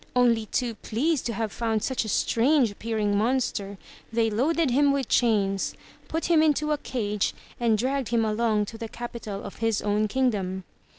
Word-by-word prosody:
Only 235 -3 +3
too 240 +1 -1
pleased 260 +8 -1
to 230 - -2
have 220 -1 -2
found 225 -2 -1
such 260 -2 0
a - - -4
strange 245 +3 +3
appearing 210 -1 -1
monster, 210 -3 0 0.3
they 225 -1 +1
loaded 290 +6 +1
him 285 +3 +4
with 275 -3 -1
chains, 200 -5 +1 0.3
put 325 +1 -2
him 330 -2 +4
into 305 -1 +2
a 300 - +1
cage, 210 -7 -2 0.2
and 230 -2 +3
dragged 260 +2 -1
him 230 -1 +2
along 215 -1 +1
to 225 +2 -9
the 225 -2 -5
capital 230 -4 -6
of - - -8
his 225 -2 +1
own 210 +1 +1
kingdom. 200 -7 -1
230 Hz, 175 wpm, -26 LUFS, 210-260 Hz, 0.3 s, him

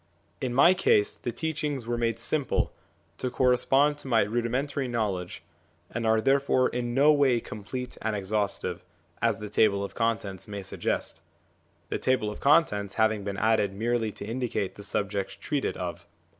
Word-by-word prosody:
In 130 - -1
my 140 +9 +6
case 105 - +2
the 120 - -4
teachings 150 -4 -3
were 120 +1 -1
made 115 -1 0
simple, 150 -4 0 0.5
to 130 - -1
correspond 135 +3 +3
to 145 - -11
my 115 -3 +4
rudimentary 125 +5 -1
knowledge, 100 -8 -2 0.5
and 115 0 -2
are 110 0 +4
therefore 135 +1 +3
in 120 0 -3
no 145 +3 +6
way 140 -5 +4
complete 125 +5 -7
and 110 -1 -1
exhaustive, 100 -3 -2 0.4
as 115 -3 +2
the 105 - -6
Table 100 -1 +2
of 100 - -6
Contents 110 -5 -2
may 100 -1 -6
suggest - - -2 0.7
the - - -2
Table 125 -5 +1
of - - -9
Contents 105 -10 +3
having 110 -2 +2
been 100 -1 -4
added 110 -2 +2
merely 115 +1 0
to - - -8
indicate 115 -4 -2
the 100 - -11
subjects 100 -1 -2
treated 145 -3 -2
of. 90 -2 -5
115 Hz, 160 wpm, -27 LUFS, 105-130 Hz, 0.7 s, my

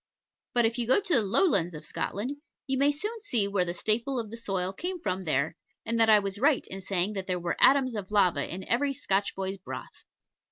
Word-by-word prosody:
But 240 -1 +4
if 230 +2 -1
you 235 - -1
go 260 - +5
to 400 -3 -1
the 245 - +5
Lowlands 200 - +2
of 150 - -8
Scotland, 245 +9 -3 0.3
you 265 - -1
may 280 +2 +3
soon 425 +10 -4
see 235 - +2
where 200 -2 +1
the 175 0 -4
staple 230 +8 0
of 220 -2 -5
the - - -6
soil 195 -5 -2
came 360 - -4
from 185 - -3
there, 155 +1 0 0.3
and 230 0 -1
that 225 0 +5
I 215 - +8
was 200 -1 -2
right 285 +2 +3
in 195 +1 -4
saying 190 +1 0
that 195 -2 -5
there 180 -1 -1
were 170 -1 -2
atoms 265 -2 +5
of 200 -3 -5
lava 180 -8 +2
in 190 +2 -6
every 275 +4 +1
Scotch 200 -5 -1
boy's 190 0 -3
broth. 185 - -9
210 Hz, 230 wpm, -28 LUFS, 190-260 Hz, 0.3 s, I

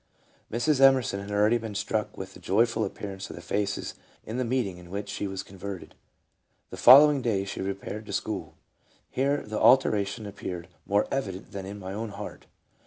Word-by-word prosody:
Mrs. 130 +5 +1
Emerson 130 -7 +5
had 100 +1 -7
already 105 +3 +3
been 110 -2 -6
struck 105 +1 -2
with 95 0 -7
the - - -12
joyful 115 +3 +2
appearance 100 -1 -5
of - - -7
the 85 - -9
faces 100 -1 -2 0.3
in 110 +3 -4
the 130 - +1
meeting 115 -7 -1
in 90 -1 -13
which 100 +2 -5
she 100 - -3
was 95 -1 -4
converted. 95 -1 -8 0.8
The - - -7
following 140 +2 +8
day 105 -5 0
she 95 - -5
repaired 100 +2 -5
to - - -6
school: - - -3 0.3
" - - -36
Here 140 +2 +1
the 105 0 -3
alteration 105 -4 +4
appeared 95 -3 -6 0.2
more 100 +1 +2
evident 100 -9 -3
than 95 -1 -6
in 100 +1 -6
my 95 -1 -6
own 110 +2 -4
heart. 100 +1 -8
105 Hz, 185 wpm, -27 LUFS, 95-115 Hz, 0.8 s, following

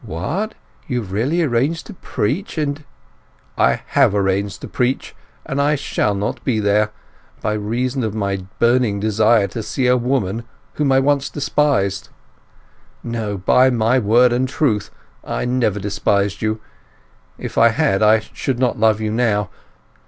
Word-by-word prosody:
"What, 120 - -3 0.3
you 125 -1 -1
have 95 -4 -9
really 135 - +1
arranged 145 +4 0
to 215 - -9
preach, 180 - -3
and—" 150 -1 -2 0.7
"I - - +2
have 130 -8 +3
arranged 100 0 0
to - - -6
preach, 125 +1 -2 0.3
and 140 +1 -1
I 145 +1 +2
shall 120 -7 -1
not 115 +5 -3
be 115 -4 0
there—by 105 +1 -2
reason 120 +5 -2
of 110 -1 -2
my 100 -2 -1 0.2
burning 120 -4 +2
desire 110 +1 +3
to 115 - -5
see 130 +4 -2
a 125 0 +4
woman 120 -4 -1 0.3
whom 145 -2 0
I 135 - +5
once 140 0 +1
despised!—No, 140 -8 0 1.4
by 125 +7 +4
my 120 +1 +2
word 120 +3 +4
and 130 +1 0
truth, 130 -7 0 0.3
I - - -3
never 125 -5 0
despised 100 -2 0
you; 110 0 -1 0.8
if - - -7
I 115 - +7
had 125 -5 +1
I 110 +1 +5
should 130 +3 -4
not 125 -3 0
love 110 -1 +3
you 110 -1 -1
now! 110 -4 0
115 Hz, 150 wpm, -19 LUFS, 105-135 Hz, 1.4 s, I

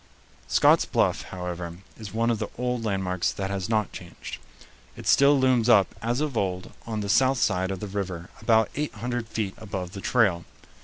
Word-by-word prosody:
Scott's - - +5
Bluff, - - +1
however, 90 -2 -5 0.2
is 110 -3 -9
one 115 +2 +1
of 115 - -1
the - - -2
old 125 -1 -1
landmarks 95 -4 0
that 95 0 -4
has 95 -1 -3
not 110 -3 +1
changed. - - -9 0.6
It - - -9
still 140 +1 +5
looms 125 -3 +3
up 100 -6 +5
as 120 +4 0
of 150 -4 -2
old 90 -3 -2 0.2
on 110 -2 -2
the 100 - -3
south 130 +5 +4
side 95 -5 +1
of 95 -2 -4
the 105 - -4
river 95 -3 -4
about 110 -2 +3
eight 150 -3 -3
hundred 120 +1 -3
feet 105 -3 -3
above 95 -4 -5
the 100 - -7
trail. 100 -7 +2
105 Hz, 190 wpm, -26 LUFS, 95-120 Hz, 0.6 s, Scott's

